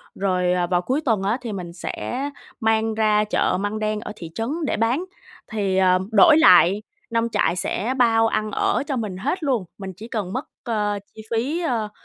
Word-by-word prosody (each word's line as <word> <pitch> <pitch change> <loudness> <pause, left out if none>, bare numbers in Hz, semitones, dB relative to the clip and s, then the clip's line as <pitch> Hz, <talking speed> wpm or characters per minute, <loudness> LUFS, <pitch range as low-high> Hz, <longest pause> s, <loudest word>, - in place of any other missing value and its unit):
rồi, 180 -2 +1
ờ, 180 -1 0
vào 175 0 +1
cuối 260 - -1
tuần 220 -6 +1
á 210 +5 +1
thì 235 -3 -5
mình 175 -3 -6
sẽ 255 +9 -4 0.3
mang 220 -1 +1
ra 215 -1 +3
chợ 210 -3 +1
Măng 205 +2 -2
Đen 215 0 -1
ở 215 - -7
thị 165 -5 -9
trấn 225 0 -2 0.2
để - - -1
bán, 240 - +1 0.5
thì, 200 -3 0
ờ, 185 -1 +4
đổi 310 +7 +7
lại 195 - +6 0.3
nông 230 0 0
trại 205 -5 +1
sẽ 215 +6 -1
bao 225 -2 +4
ăn 215 -1 -1
ở - - +1
cho 275 - -1
mình 210 -6 -3
hết 345 - -2
luôn, 250 -9 0
mình 195 -2 -7
chỉ 220 +3 -9
cần 205 -5 -4
mất, 260 - -3 0.2
ơ, 210 -4 -1 0.2
chi 220 - -9
phí, 265 +9 0
ơ, 230 -10 -1
215 Hz, 205 wpm, -22 LUFS, 195-235 Hz, 0.5 s, đổi